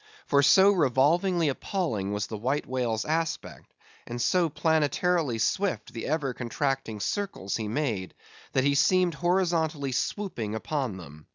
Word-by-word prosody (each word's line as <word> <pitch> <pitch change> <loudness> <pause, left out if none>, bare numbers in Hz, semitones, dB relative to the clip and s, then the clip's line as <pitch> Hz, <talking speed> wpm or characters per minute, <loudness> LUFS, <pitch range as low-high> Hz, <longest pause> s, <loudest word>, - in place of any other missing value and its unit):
For 140 - +3
so 190 +7 +6
revolvingly 165 +3 +2
appalling 135 - -2
was 105 0 -1
the 110 - -6
White 130 +7 -1
Whale's 120 -4 -1
aspect, 165 +1 -3 0.4
and 120 0 -5
so 175 +6 +2
planetarily 160 -2 +1
swift 195 - -1
the 115 - -5
ever 145 -4 -1
contracting 130 -2 -2
circles 190 - -2
he 110 -2 -4
made, 110 -6 -2 0.4
that 130 - +2
he 140 +1 +3
seemed 180 +5 +3
horizontally 165 -4 0
swooping 125 - -2
upon 130 -3 -3
them. 75 -4 -12
140 Hz, 140 wpm, -27 LUFS, 115-170 Hz, 0.4 s, so